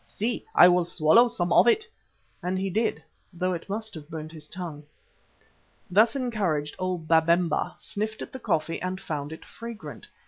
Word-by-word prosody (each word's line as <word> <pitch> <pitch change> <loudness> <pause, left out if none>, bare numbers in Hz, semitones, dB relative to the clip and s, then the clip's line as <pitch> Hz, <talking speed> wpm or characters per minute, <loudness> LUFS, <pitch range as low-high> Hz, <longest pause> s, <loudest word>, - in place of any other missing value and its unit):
See, 230 +3 -2
I 175 - +9
will 180 0 +4
swallow 170 +8 +5
some 175 -7 -1
of - - +6
it," 435 - +4 0.6
and 180 +1 -1
he 190 0 -2
did, 220 +4 0 0.3
though 185 +1 -1
it 170 +2 -6
must 220 +2 -3
have 150 -1 -10
burnt 155 -1 -6
his 155 -2 -9
tongue. 165 -4 -7 1.1
Thus 220 +6 +5
encouraged, 195 - -1
old 180 -3 -2
Babemba 165 0 +2
sniffed 215 +1 -4
at - - -10
the 260 - -7
coffee 165 -7 -1
and 185 +1 -3
found 145 -3 -4
it 160 - -9
fragrant. 230 -1 -9
180 Hz, 170 wpm, -26 LUFS, 160-215 Hz, 1.1 s, I